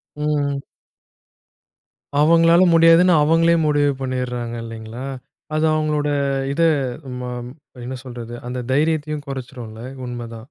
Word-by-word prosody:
ம். 145 Hz, -2 st, -1 dB, 1.6 s
அவுங்களால 165 Hz, +3 st, +5 dB
முடியாதுன்னு 165 Hz, +2 st, +6 dB
அவுங்களே 165 Hz, +2 st, +4 dB
முடிவு 145 Hz, -1 st, +3 dB
பண்ணிட்றாங்க 125 Hz, -2 st, -3 dB
இல்லேங்களா! 115 Hz, +2 st, -8 dB, 0.5 s
அது 155 Hz, +1 st, +2 dB
அவுங்களோட 150 Hz, -1 st, 0 dB, 0.4 s
இத 165 Hz, -, -1 dB, 0.6 s
மாம், 125 Hz, -1 st, -5 dB, 0.4 s
என்ன 130 Hz, +1 st, -5 dB
சொல்றது, 120 Hz, -1 st, -8 dB
அந்த 125 Hz, 0 st, -4 dB
தைரியத்தையும் 150 Hz, 0 st, 0 dB
குறைச்சிரும்ல? 120 Hz, -4 st, -7 dB, 0.2 s
உண்ம 120 Hz, -1 st, -5 dB
தான். 115 Hz, -, -7 dB
140 Hz, 105 wpm, -21 LUFS, 125-155 Hz, 1.6 s, முடியாதுன்னு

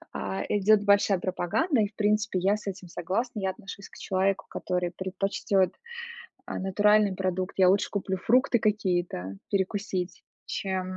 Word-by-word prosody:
А, 95 Hz, 0 st, -3 dB
идёт 210 Hz, +1 st, +4 dB
большая 200 Hz, -1 st, +4 dB
пропаганда, 205 Hz, -, 0 dB
и, 205 Hz, -, +2 dB
в 205 Hz, -, -21 dB
принципе, 210 Hz, -2 st, +1 dB
я 195 Hz, +3 st, +3 dB
с 210 Hz, -, -12 dB
этим 185 Hz, -1 st, -5 dB
согласна. 205 Hz, +8 st, -2 dB
Я 190 Hz, -1 st, 0 dB
отношусь 195 Hz, +1 st, -10 dB
к -, -, -15 dB
человеку, 190 Hz, +1 st, 0 dB
который 180 Hz, -1 st, -2 dB
предпочтёт, 190 Hz, +1 st, 0 dB, 0.8 s
а, -, -, -4 dB
натуральный 205 Hz, +1 st, +3 dB
продукт. 185 Hz, 0 st, -2 dB
Я 185 Hz, -1 st, +6 dB
лучше 195 Hz, +2 st, +3 dB
куплю 190 Hz, -1 st, -2 dB
фрукты 245 Hz, +5 st, +3 dB
какие-то 175 Hz, -, -1 dB
перекусить, 190 Hz, -2 st, -2 dB, 0.2 s
чем, 190 Hz, -1 st, -2 dB
195 Hz, 150 wpm, -27 LUFS, 185-210 Hz, 0.8 s, Я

